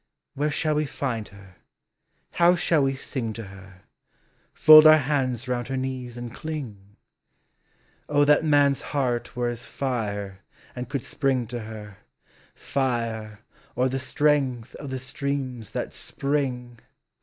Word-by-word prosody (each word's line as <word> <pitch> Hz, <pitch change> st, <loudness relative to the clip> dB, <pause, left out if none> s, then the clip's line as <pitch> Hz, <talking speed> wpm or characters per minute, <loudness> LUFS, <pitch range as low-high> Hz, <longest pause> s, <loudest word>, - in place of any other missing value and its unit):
Where 150 Hz, +2 st, 0 dB
shall 155 Hz, +1 st, 0 dB
we 150 Hz, 0 st, 0 dB
Bud 120 Hz, -6 st, -3 dB
her. 100 Hz, -2 st, -16 dB, 0.7 s
how 175 Hz, +1 st, +4 dB
shall 165 Hz, -2 st, +2 dB
we 135 Hz, 0 st, +1 dB
sing 125 Hz, -4 st, -4 dB
to 115 Hz, -, -7 dB
her, 95 Hz, -1 st, -14 dB, 0.7 s
Fold 155 Hz, 0 st, +9 dB
our 155 Hz, 0 st, +9 dB
hands 130 Hz, -4 st, -1 dB
round 120 Hz, -1 st, -2 dB
her 135 Hz, 0 st, -3 dB
knees 130 Hz, -2 st, -4 dB
and 120 Hz, -1 st, -7 dB
cling. 110 Hz, -11 st, -7 dB, 1.1 s
O 145 Hz, 0 st, +4 dB
that 150 Hz, +2 st, +4 dB
man's 145 Hz, -3 st, +3 dB, 0.2 s
heart 125 Hz, -3 st, -1 dB
were 120 Hz, 0 st, 0 dB
as 120 Hz, 0 st, -4 dB
Qre 105 Hz, -7 st, -3 dB, 0.4 s
and 125 Hz, -1 st, -6 dB
could 140 Hz, -3 st, -2 dB
sprln 130 Hz, -4 st, -1 dB
to 120 Hz, -1 st, -4 dB
her. 110 Hz, -2 st, -9 dB, 0.6 s
Fire, 115 Hz, -5 st, -2 dB, 0.3 s
or 130 Hz, +1 st, +2 dB
the 135 Hz, +1 st, -2 dB
strength 130 Hz, -2 st, 0 dB
of 145 Hz, -, -7 dB
the 130 Hz, -, -3 dB
streams 130 Hz, -3 st, -4 dB
that -, -, -3 dB
spring. 125 Hz, -4 st, -3 dB
130 Hz, 140 wpm, -25 LUFS, 115-140 Hz, 1.1 s, Fold